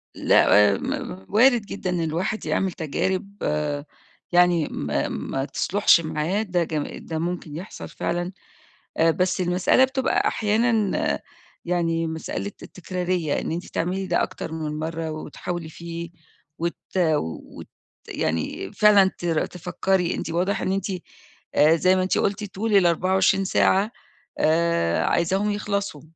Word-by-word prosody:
لأ، 105 -1 +5
م 95 +1 -5
وارد 240 +2 +5
جدًا 195 -2 -4
إن 180 -1 0
الواحد 175 +7 -2
يعمل 190 -1 0
تجارب 185 +5 -2 1.0
يعني 175 -3 +4
ما - - -2
ما 135 0 -3
تصلحش 195 +3 +3
معاه، 160 +5 -1
ده 180 -4 0
ج 155 -2 -3
ده 160 -1 -5
ممكن 170 -3 -4
يحصل 180 +6 -8
فعلًا. 175 +1 -2 0.7
آآ 165 0 +4
بس 185 +2 0
المسألة 180 +7 +3
بتبقى 265 0 +1
أحيانًا 220 -1 +1 0.5
يعني 165 -2 0
مسألة 160 +5 -4
التكرارية، 180 -3 -2
إن - - -4
أنتِ 170 +2 -3
تعملي 185 +3 -2
ده 175 - +2
أكتر - - -5
من 155 -1 -4
مرّة 160 0 -3
وتحاولي 160 +2 -5
فيه، 170 +1 -7 0.5
وت 170 +1 -1 0.2
وت 155 - -1 0.4
يعني 80 +4 -2
فعلًا 205 -3 +5
تر 165 -3 0
تفكري، 180 0 -1
أنتِ - - -4
واضح 180 +4 0
إن - - -1
أنتِ 195 -1 -1 0.7
آآ 155 +2 +6
زي 185 +3 +3
ما 185 - +1
أنتِ 185 - +1
قُلتِ 205 +2 0
طول 215 +2 0
ال24 190 +2 +3
ساعة 195 +3 +3 0.5
آآ، 160 - +2
عايزاهم 190 +5 +1
يخلصوا. 200 -6 -2
175 Hz, 130 wpm, -24 LUFS, 160-190 Hz, 1.0 s, آآ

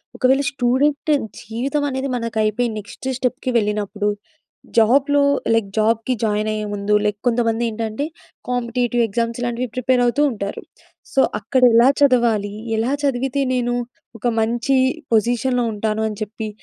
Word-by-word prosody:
ఒకవేళ 265 +1 +3
student 280 +3 +1 0.4
జీవితమనేది 275 +3 -1
మనకయిపోయి 230 0 0
next 205 +5 -8
స్టెప్‌కి 255 0 -2
వెళ్ళినప్పుడు, 210 -1 -1 0.7
జాబ్‌లో 275 +6 +4 0.3
లైక్ 225 -3 +1
జాబ్‌కి 225 +3 +2
జాయినయ్యే 215 0 0
ముందు 205 +1 0
లైక్ 210 0 0
కొంతమందేంటంటే 230 +1 0 0.4
కాంపిటీటివ్ 245 -1 0
ఎగ్జామ్స్ 230 +2 -2
ఇలాంటివి 240 0 -2
ప్రిపేరవుతూ 250 +1 +2
ఉంటారు. 200 -3 -5 0.5
సో, 270 - +4 0.2
అక్కడెలా 245 -2 +4
చదవాలి? 235 -7 +3 0.3
ఎలా 235 +4 0
చదివితే 270 +1 0
నేను 245 -1 0 0.5
ఒక 240 - -1
మంచి 240 +4 0 0.4
పొజిషన్‌లో 245 +3 +2
ఉంటాను 215 +1 -2
అని 210 - -7
చెప్పి, 215 +1 -6
235 Hz, 110 wpm, -20 LUFS, 215-255 Hz, 0.7 s, జాబ్‌లో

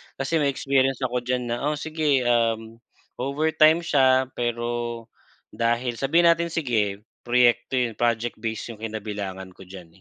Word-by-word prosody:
Kasi 155 +4 -1
may 145 - +2
experience 135 -1 +1
ako 125 0 0
diyan 125 -1 -2
na 120 +5 -2
o 150 - 0
sige, 150 -3 0
uhm, 115 -1 0 0.4
overtime 155 +4 +3
siya 130 -4 +4
pero 120 -1 -3 0.5
dahil 120 +1 -1
sabihin 170 +5 +4
natin, 170 0 0
sige 110 -11 -1 0.2
proyekto 120 +1 +2
yun 120 -3 0
project 120 +1 0
base 115 +1 -4
'yung 110 - -16
kinabilangan 100 -4 -6
ko - - -17
diyan, 90 -3 -12
120 Hz, 145 wpm, -24 LUFS, 115-135 Hz, 0.5 s, siya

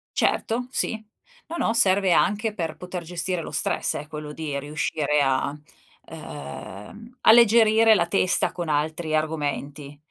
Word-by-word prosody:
Certo, 245 +2 0
sì. - - -1 0.5
No, 335 +1 -6
no, 225 - 0
serve 195 -4 +3
anche 210 +4 +2
per 165 -5 -4
poter 180 -1 -7
gestire 175 +1 -3
lo 155 - -8
stress, 155 - -1
eh, 150 - -6
quello 150 -1 -7
di 145 -3 -4
riuscire 150 0 -1
a, 135 +1 0 0.5
ehm, 100 - -10
alleggerire 225 -1 +6
la 170 -2 +1
testa 185 -1 +2
con 175 -2 -5
altri 155 +1 -1
argomenti. 145 -2 -3
160 Hz, 135 wpm, -24 LUFS, 150-205 Hz, 0.5 s, alleggerire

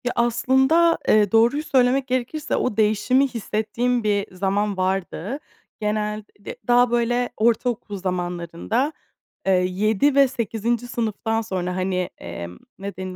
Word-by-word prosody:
Ya, 245 - -1
aslında, 265 +8 +3
ııı, 210 -2 +4
doğruyu 235 +7 +3
söylemek 260 -2 +2
gerekirse 255 +4 -2
o 250 -4 -1
değişimi 220 +6 +3
hissettiğim 235 +1 -1
bir 205 -3 -1
zaman 200 +2 0
vardı. 190 - -2 0.4
Genel 210 0 -2 0.2
d 200 - -8
daha, 245 0 +4
böyle, 240 +1 +1
ortaokul 225 -2 0
zamanlarında, 180 - -2 0.5
eee, - - +4
7 200 +9 +2
ve 280 -1 +6
8'inci 235 0 -2
sınıftan 225 -1 -1
sonra, 185 -4 -3
hani, 185 -1 -1
emm, 85 +1 -8 0.2
ne 200 0 -6
denir 185 0 -6
220 Hz, 130 wpm, -23 LUFS, 195-245 Hz, 0.5 s, ve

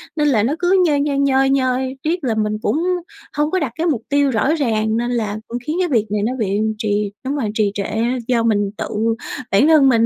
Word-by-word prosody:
Nên 300 -2 +1
là 230 -8 +3
nó 255 +6 +1
cứ 365 +1 +3
nhoi 295 -4 +2
nhoi, 285 -1 0
nhoi 270 -1 +3
nhoi, 260 -1 0
riết 335 +2 -1
là 235 -4 0
mình 215 -1 0
cũng - - 0 0.6
hông 300 +1 +1
có 375 - +1
đặt 290 -8 -2
cái 330 +2 -1
mục 275 -9 0
tiêu 285 -1 +2
rõ 245 +7 +1
ràng, 220 -6 0
nên 240 +1 -1
là 215 -4 -1
cũng 235 - -4
khiến 310 - -1
cái 365 - +2
việc 225 -6 +2
này 210 -1 0
nó 235 +4 0
bị 200 -2 0 0.2
trì 210 -2 -1
đúng 275 +2 -1
rồi, 245 -7 -1
trì 215 -2 +1
trệ. 205 - -2 0.4
Do 235 -2 +2
mình 205 -3 +1
tự - - -3 0.6
bản 205 +10 +4
thân 300 -4 +6
mình 230 -2 +4
255 Hz, 240 wpm, -19 LUFS, 215-290 Hz, 0.6 s, thân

